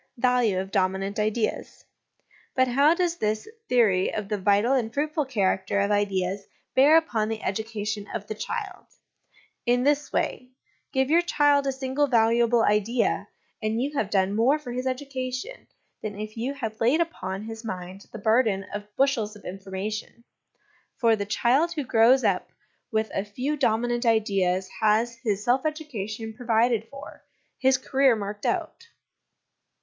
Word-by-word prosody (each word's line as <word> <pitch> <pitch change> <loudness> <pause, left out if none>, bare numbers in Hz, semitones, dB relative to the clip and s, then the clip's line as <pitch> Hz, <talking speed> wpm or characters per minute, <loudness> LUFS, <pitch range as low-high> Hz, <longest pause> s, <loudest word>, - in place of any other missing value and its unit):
Value 245 -5 +2
of 190 +1 -5
Dominant 195 +1 0
Ideas. 215 +1 -2 0.7
But 260 0 +3
how 280 +6 +4
does 345 -1 0
this 215 -3 -1 0.2
theory 210 -7 +3
of 210 -2 -4
the 210 - 0
vital 205 +6 +3
and 235 -4 0
fruitful 300 +3 -1
character 200 -5 0
of 200 +1 +1
ideas 195 -1 0 0.3
bear 285 +5 +6
upon 225 -10 0
the 225 -1 -4
education 210 0 -3
of 205 - -4
the 215 - -4
child? 390 - -5 0.8
In 245 +1 +3
this 290 +1 +1
way: 250 - -2 0.4
give 265 +1 +1
your 335 +2 +6
child 290 -4 +2
a - - +2
single 265 +2 -1
valuable 235 -1 +3
idea, 210 +3 +1 0.3
and 215 +1 -1
you 285 +4 -2
have 215 -7 0
done 195 -1 +1
more 250 +7 +3
for 290 -5 -8
his 255 +2 -3
education 260 - -4 0.3
than 210 -2 -5
if 215 0 -6
you 250 +5 -3
had 220 -5 -5
laid 250 +8 +3
upon 195 - -3
his 225 +1 -8
mind 185 -2 -7
the - - -7
burden 220 -2 +2
of 205 0 -7
bushels 245 -6 +1
of 210 - -15
information; 195 +5 -6 0.7
for 230 -3 +4
the 200 -1 -4
child 265 +10 +2
who 300 -4 -2
grows 250 +1 +4
up - - +1 0.4
with 220 -1 0
a 195 - -1
few 250 +9 -3
dominant 240 -2 0
ideas 195 -4 +1
has 220 +2 +2
his 210 -3 -1
self 250 +3 +2
education 225 -9 -4
provided 230 -1 +1
for, 275 0 -11 0.4
his 265 0 +4
career 265 -1 +3
marked 205 0 -4
out. 465 - -3
225 Hz, 155 wpm, -26 LUFS, 205-265 Hz, 0.8 s, bear